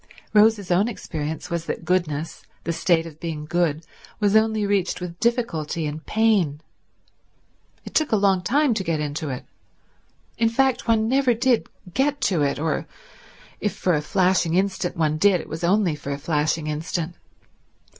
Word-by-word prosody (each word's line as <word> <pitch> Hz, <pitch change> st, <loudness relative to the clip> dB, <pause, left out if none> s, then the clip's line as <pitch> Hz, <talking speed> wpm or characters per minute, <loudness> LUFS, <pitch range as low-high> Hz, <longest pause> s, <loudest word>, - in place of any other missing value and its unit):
Rose's 210 Hz, -3 st, +4 dB
own 190 Hz, +5 st, +3 dB
experience 160 Hz, -6 st, -5 dB
was 170 Hz, -1 st, -2 dB
that 165 Hz, -, -4 dB
goodness, 160 Hz, -3 st, -1 dB, 0.2 s
the 170 Hz, -, -1 dB
state 165 Hz, -1 st, +2 dB
of 160 Hz, -2 st, -11 dB
being 160 Hz, -3 st, -4 dB
good, 165 Hz, -1 st, 0 dB, 0.3 s
was 205 Hz, -1 st, +2 dB
only 220 Hz, -1 st, +3 dB
reached 200 Hz, -2 st, 0 dB
with 175 Hz, -1 st, -7 dB
difficulty 170 Hz, -10 st, -1 dB
and 150 Hz, +2 st, -5 dB
pain. 205 Hz, -10 st, +2 dB, 1.3 s
It -, -, -9 dB
took 310 Hz, -1 st, +1 dB
a -, -, +4 dB
long 195 Hz, -2 st, +3 dB
time 275 Hz, +7 st, +2 dB
to 205 Hz, -, -2 dB
get 150 Hz, -4 st, -2 dB
to 155 Hz, -, -3 dB
it; 130 Hz, -1 st, -5 dB, 0.9 s
in 230 Hz, -1 st, +4 dB
fact 265 Hz, +2 st, +1 dB
one 220 Hz, -1 st, +3 dB
never 260 Hz, -1 st, +3 dB
did 245 Hz, +1 st, +1 dB, 0.2 s
get 285 Hz, +2 st, +1 dB
to 175 Hz, -6 st, +1 dB
it, 140 Hz, -1 st, +1 dB
or, 155 Hz, 0 st, -1 dB, 0.7 s
if 210 Hz, -, -2 dB
for 180 Hz, -, +1 dB
a 150 Hz, -, +1 dB
flashing 180 Hz, 0 st, +2 dB
instant 190 Hz, -2 st, 0 dB
one 155 Hz, -1 st, +1 dB
did, 195 Hz, 0 st, +4 dB
it -, -, -8 dB
was 160 Hz, +2 st, -6 dB
only 185 Hz, -1 st, +3 dB
for 145 Hz, -, -8 dB
a 140 Hz, -, -2 dB
flashing 155 Hz, +1 st, 0 dB
instant. 160 Hz, +3 st, -3 dB
175 Hz, 165 wpm, -23 LUFS, 155-215 Hz, 1.3 s, Rose's